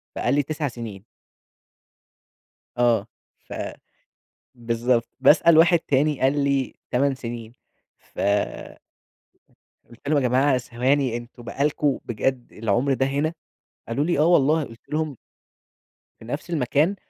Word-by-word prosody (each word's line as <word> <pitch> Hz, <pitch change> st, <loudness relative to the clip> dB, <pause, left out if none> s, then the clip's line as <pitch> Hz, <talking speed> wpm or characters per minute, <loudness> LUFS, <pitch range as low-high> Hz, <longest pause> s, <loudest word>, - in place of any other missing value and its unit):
فقال 120 Hz, -, 0 dB
لي: 145 Hz, -, +2 dB
"9 150 Hz, +1 st, -3 dB
سنين." 115 Hz, -6 st, -8 dB, 1.7 s
آه، 115 Hz, -4 st, +2 dB, 0.3 s
ف -, -, -12 dB, 1.0 s
بالضبط، 120 Hz, 0 st, 0 dB
باسأل 155 Hz, +4 st, +6 dB
واحد 170 Hz, +1 st, +6 dB
تاني، 145 Hz, -1 st, +1 dB
قال 140 Hz, +2 st, +2 dB
لي: 140 Hz, -2 st, 0 dB, 0.2 s
"8 135 Hz, +2 st, +2 dB
سنين"، 115 Hz, -3 st, -7 dB, 0.5 s
ف -, -, -11 dB, 1.7 s
قُلت 120 Hz, +4 st, -11 dB
لهم: 150 Hz, 0 st, +3 dB
"يا 125 Hz, -, +2 dB
جماعة 130 Hz, +2 st, +3 dB
ثواني، 125 Hz, +1 st, 0 dB
أنتم 120 Hz, +1 st, -10 dB
بقى 135 Hz, +4 st, -2 dB
لكم- 145 Hz, -2 st, +1 dB
بجد- 120 Hz, +2 st, -2 dB
العُمْر 120 Hz, +6 st, +2 dB
ده 130 Hz, 0 st, +1 dB
هنا!"، 145 Hz, +4 st, 0 dB, 0.6 s
قالوا 135 Hz, +6 st, 0 dB
لي: 170 Hz, -3 st, 0 dB
"آه 150 Hz, -, +5 dB
والله." 155 Hz, -2 st, +4 dB
قُلت 115 Hz, -3 st, -13 dB
لهم 155 Hz, -3 st, -2 dB, 1.0 s
في -, -, -13 dB
نفْس 145 Hz, +8 st, -5 dB
المكان، 155 Hz, +4 st, +1 dB
135 Hz, 125 wpm, -24 LUFS, 120-145 Hz, 1.7 s, باسأل